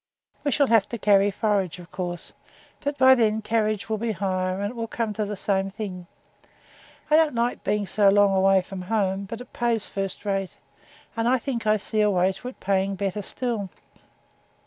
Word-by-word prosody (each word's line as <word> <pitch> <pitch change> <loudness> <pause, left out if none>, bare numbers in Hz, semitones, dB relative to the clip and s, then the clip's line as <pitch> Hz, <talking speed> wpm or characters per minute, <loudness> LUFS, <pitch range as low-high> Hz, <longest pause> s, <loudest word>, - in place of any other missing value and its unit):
'We 290 - +1
shall 285 +1 +3
have 225 -5 +3
to 235 - -4
carry 200 -1 +4
forage, 200 -4 0
of 175 -1 -13
course; 175 -2 -5 0.5
but 285 0 -3
then 230 -5 +4
carriage 215 -1 0
will 220 -1 -2
be 230 0 -1
higher, 185 -1 -1
and 205 +1 -2
it - - -12
will 230 -1 -3
come 225 -2 -2
to 210 +1 -2
the 205 0 -4
same 195 0 0
thing. 190 -4 -7 1.0
I - - +7
don't 315 -4 +4
like 235 +1 -1
being 210 -1 0
so 200 +1 +3
long 200 0 +4
away 190 0 +4
from 190 0 -7
home; 195 0 -1
but 230 +4 -7
it 250 - -13
pays 235 -3 0
first 195 +1 -5
rate, 195 -2 -2 0.6
and 225 +1 0
I 260 - +4
think 235 -3 -4
I 215 0 +4
see 215 +1 -1
a 210 - +4
way 185 -1 +2
to 195 +6 -9
its 255 - -8
paying 195 0 0
better 200 +1 -2
still.' 225 -2 -3
205 Hz, 195 wpm, -25 LUFS, 195-230 Hz, 1.0 s, I